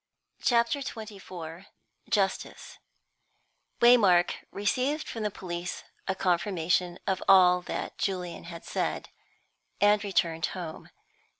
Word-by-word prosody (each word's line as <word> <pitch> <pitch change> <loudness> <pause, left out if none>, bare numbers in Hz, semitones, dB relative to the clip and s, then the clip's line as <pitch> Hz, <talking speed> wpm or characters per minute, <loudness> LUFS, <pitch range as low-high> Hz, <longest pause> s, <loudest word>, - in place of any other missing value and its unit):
CHAPTER 235 +3 +2
XXIV 195 - -8 0.4
JUSTICE 195 -2 -1 1.0
Waymark 205 -8 +6 0.2
received 255 +9 -1
from 225 - -5
the 210 - 0
police 180 -2 -5 0.2
a 190 - 0
confirmation 180 -1 0
of 190 -2 0
all 180 -2 +7
that - - -5
Julian 180 -4 -3
had 170 -1 -9
said, - - -2 0.7
and 205 0 +4
returned 165 -5 0
home. 165 -3 -7
190 Hz, 100 wpm, -28 LUFS, 175-210 Hz, 1.0 s, all